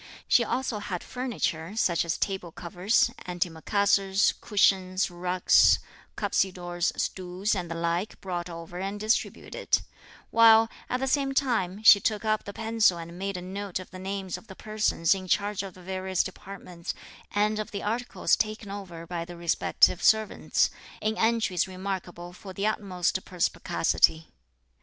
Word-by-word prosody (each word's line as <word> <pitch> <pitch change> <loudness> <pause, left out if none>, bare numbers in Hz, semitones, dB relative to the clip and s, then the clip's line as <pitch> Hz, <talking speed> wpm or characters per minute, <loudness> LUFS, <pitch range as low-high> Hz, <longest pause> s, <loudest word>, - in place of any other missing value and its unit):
She - - +5
also 255 -5 -2
had 185 -4 -5
furniture, 210 -8 -3
such 175 -6 +2
as 170 - -1
table 190 -4 -2
covers, 180 +8 +1 0.2
antimacassars, 190 +3 +1
cushions, 190 -2 +2
rugs, 180 +1 +4 0.4
cuspidors, 175 -2 0
stools 185 +2 -1
and 180 -4 -3
the 165 - -4
like 170 +4 -2
brought 175 -2 -4
over 170 +1 -8
and 195 +2 -4
distributed; 215 +2 0 0.5
while, 225 0 +7 0.2
at 250 - -1
the - - +1
same 270 0 0
time, 220 -8 0
she 210 -2 +9
took 215 +1 -1
up 215 0 0
the 200 - -5
pencil 225 -4 +2
and 170 +1 -8
made 195 0 -3
a 180 - -7
note 195 +1 -4
of 185 - -11
the 185 - -9
names 190 -1 -4
of - - -22
the 190 - -11
persons 215 -6 +1
in 190 -1 -6
charge 205 +1 0
of 195 -3 -8
the 185 - -14
various 185 0 -1
departments, 185 -3 -8 0.3
and 210 +1 +1
of 215 - -4
the 200 - -5
articles 235 +4 +1
taken 215 -1 -3
over 180 -5 -7
by 170 0 -4
the 175 0 -10
respective 170 +1 +2
servants, 220 -1 +2 0.3
in 215 +1 -1
entries 225 -7 +1
remarkable 185 -2 -6
for 190 0 -10
the 200 +2 -2
utmost 190 -4 -1
perspicacity. 165 -2 +1
190 Hz, 150 wpm, -27 LUFS, 175-215 Hz, 0.5 s, she